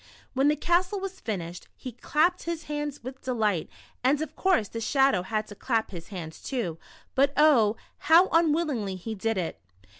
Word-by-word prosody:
When 270 +2 +3
the 300 - +4
castle 355 +6 +1
was 385 0 -6
finished, 180 -5 -5
he 255 - -7
clapped 315 +9 +1
his 335 -1 -3
hands 295 -3 -4
with 260 +2 -8
delight, 215 -9 0 0.3
and 275 +3 +3
of 315 - -5
course 365 - +2
the 230 - -6
Shadow 270 -4 +3
had 215 +3 -2
to - - -8
clap 225 -1 -1
his 170 -3 -8
hands 165 -5 -8
too, 185 - -3 0.3
but 275 +1 +3
oh, 240 -8 +5 0.2
how 335 +4 +6
un 330 -1 +4
willingly 270 - -1
he 205 +5 -5
did 220 +1 -1
it. 175 -3 -3
260 Hz, 180 wpm, -27 LUFS, 210-310 Hz, 0.3 s, how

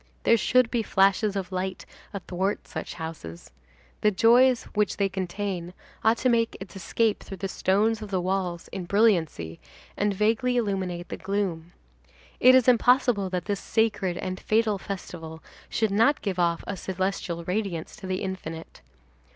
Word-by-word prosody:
There 230 - +5
should 245 +1 +3
be 240 - +1
flashes 200 0 +2
of 190 -2 -3
light 185 0 -3 0.3
athwart 195 0 -3
such - - -6
houses. 160 - -8 0.5
The 210 - +5
joy 235 +6 +6 0.2
which 210 -1 0
they 200 - +2
contain 185 -1 -4 0.3
ought 225 +1 +4
to - - +7
make 230 -1 +1
its 195 +1 -10
escape 215 +3 0
through 195 - -8
the 195 - -3
stones 210 +4 +1
of 215 - -7
the 190 -2 0
walls 180 -2 -2
in 185 -2 -5
brilliancy, 170 - +1 0.4
and 205 0 +1
vaguely 225 +5 +1
illuminate 190 -6 -2
the - - -5
gloom. 185 -4 -3 0.7
It 255 +1 +7
is 260 -2 +4
impossible 245 -4 +4
that 180 -1 -3
this 205 -2 -2
sacred 210 -5 0
and 185 -1 -4
fatal 215 -2 +1
festival 165 -5 -7 0.3
should 220 -3 0
not 230 +8 +3
give 190 -3 -2
off 170 -1 +1
a 200 - -4
celestial 185 -2 -3
radiance 180 -2 -3
to 200 -3 -8
the 185 +1 -2
infinite. 165 -4 -6
195 Hz, 160 wpm, -26 LUFS, 180-220 Hz, 0.7 s, to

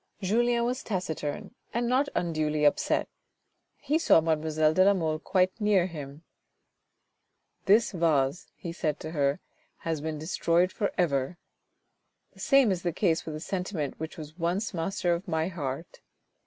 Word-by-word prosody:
Julien 235 +4 +2
was 250 +2 -1
taciturn, 160 -5 -4 0.2
and 235 0 +1
not 265 +4 +2
un 170 -2 0
duly 155 -1 0
upset. 145 - +2 0.7
He 300 +3 0
saw 325 - +6
mademoiselle 155 -1 +1
de 185 - +5
la 200 +1 +5
Mole 160 -4 -1
quite 185 +4 +1
near 205 -4 +3
him. 150 -3 -8 1.4
"This 215 +4 +4
vase," 160 -4 +1
he 170 -2 -6
said 155 -3 -2
to 155 - -6
her, 145 -1 +1 0.5
"has 160 -3 -1
been 155 0 -3
destroyed 170 +3 +1
for 200 - -1
ever. 145 -2 0 1.0
The - - -19
same 275 -6 +4
is 180 -2 -1
the 175 - -1
case 170 -2 0
with 155 - -4
the - - -5
sentiment 180 -4 -3
which 160 0 -6
was 155 +2 -10
once 180 +6 -1
master 175 +1 0
of 175 +5 -4
my 160 0 0
heart. 155 -2 -5
170 Hz, 155 wpm, -28 LUFS, 155-195 Hz, 1.4 s, saw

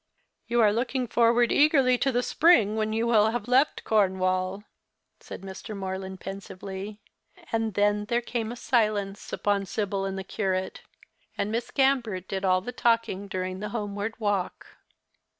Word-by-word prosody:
"You 240 0 +2
are 210 -2 +5
looking 250 +3 -1
forward 235 +1 +3
eagerly 280 -4 +4
to 270 - +1
the 245 0 0
spring, 245 - +4
when 215 0 -1
you 225 +1 0
will 220 -2 +4
have 230 -1 -3
left 260 +4 +2
Cornwall," 185 -1 +1 0.6
said - - -9
Mr. 195 +2 -8
Morland, 190 0 -5
pensively; 195 +1 -7 0.5
and 225 -3 -1
then 205 0 +2
there 235 +2 +1
came 235 -2 -3
a - - -6
silence 210 -5 0
upon 200 -1 0
Sibyl 200 -2 -2
and 195 0 -3
the 190 - -4
curate, 190 -2 -2 0.6
and 205 - -1
Miss 230 +1 -2
Gambert 240 -9 +1
did 190 0 -3
all 185 -1 +3
the 245 - -6
talking 230 -5 0
during 185 -1 -4
the 210 +1 -4
homeward 205 0 -4
walk. 205 -4 -2
210 Hz, 155 wpm, -27 LUFS, 195-235 Hz, 0.6 s, are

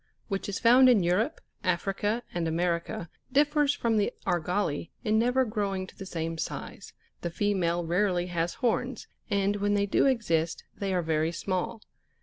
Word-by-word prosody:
which 195 0 -2
is 200 - -2
found 250 +2 +7
in 220 -7 +5
Europe, 180 +6 +1 0.2
Africa, 195 +5 0
and 170 -1 -1
America, 170 +1 -1 0.2
differs 295 +1 +3
from 230 -2 +1
the 205 - +2
Jlrgali 175 -2 0
in 215 -2 +2
never 250 +3 +3
growing 200 -4 -2
to - - -15
the 195 - -8
same 165 -2 -3
size: - - -6 0.3
the 170 - -2
female 175 -2 0
rarely 180 +1 +1
has 175 -1 -2
horns, 245 -2 -1 0.2
and 200 0 +1
when 205 0 +1
they 200 0 +2
do 200 - +3
exist, 170 -11 0
they 195 -1 -2
are 180 -2 +1
very 160 0 +1
small. 185 +5 -3
195 Hz, 160 wpm, -28 LUFS, 170-215 Hz, 0.3 s, found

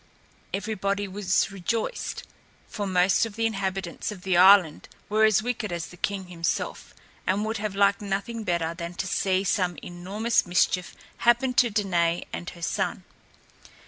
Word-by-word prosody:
Everybody 200 0 -2
was 190 0 0
rejoiced, 225 - -3 0.4
for 205 -2 -4
most 185 +3 +3
of 210 - -12
the 225 0 0
inhabitants 195 -4 -2
of 185 -4 -10
the 190 -2 +1
island 185 -3 +6 0.2
were 215 +1 +4
as 215 -1 +3
wicked 235 -4 -2
as 170 -1 -3
the - - -12
king 195 +1 -2
himself 170 -2 -3 0.3
and 200 +3 +1
would 220 +1 -2
have 205 -1 -3
liked 200 +2 +3
nothing 205 +3 -3
better 170 -3 -1
than 170 0 -6
to - - -3
see 190 0 +1
some 180 -3 0
enormous 195 +7 -1
mischief 180 0 +1 0.2
happen 240 +2 +3
to 250 -2 +4
Danaë 175 -5 0
and 175 - -5
her 170 -1 -11
son. - - -1
195 Hz, 155 wpm, -26 LUFS, 180-215 Hz, 0.4 s, island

